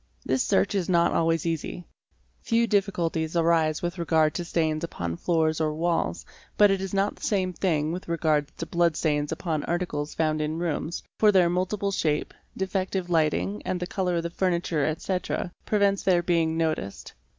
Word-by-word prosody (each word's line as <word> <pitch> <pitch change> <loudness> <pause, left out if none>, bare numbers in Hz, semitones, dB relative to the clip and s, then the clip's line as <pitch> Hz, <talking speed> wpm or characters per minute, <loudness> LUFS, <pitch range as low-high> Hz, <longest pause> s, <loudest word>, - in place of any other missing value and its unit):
This 130 0 +1
search 95 +1 +2
is 190 -3 -1
not 170 -2 +3
always 165 0 +1
easy; 165 +1 -3 0.6
few 230 0 +2
difficulties 175 -6 0
arise 165 -2 +2
with 175 +1 -3
regard 160 -2 +2
to 175 - -3
stains 160 -2 -1
upon 85 - -3
floors 160 - +1
or 155 -1 0
walls 165 - -1 0.3
but 205 -1 +6
it 195 -1 0
is 195 -1 -4
not 200 +1 0
the - - -19
same 185 -3 0
thing 160 -5 0
with 180 +2 -5
regards 155 -3 +1
to 165 - -4
blood 170 -1 +1
stains 150 -2 0
upon 160 -4 -2
articles 165 -4 -2
found 155 -1 +1
in 155 +1 -2
rooms, 170 0 -3 0.2
for 215 -1 +6
their 180 -3 +4
multiple 195 +3 -1
shape, 155 -6 -1 0.2
defec 190 0 -1
tive 180 -2 -3
lighting, 105 - +1
and 180 - -2
the 180 - -2
colour 180 -1 -1
of 170 - -1
the 170 - -4
furniture, 170 -4 0
etc., 180 +3 -2 0.2
prevents 200 -2 +2
their 180 -2 +3
being 165 -2 +1
noticed. 155 -12 -2
170 Hz, 180 wpm, -26 LUFS, 155-185 Hz, 0.6 s, but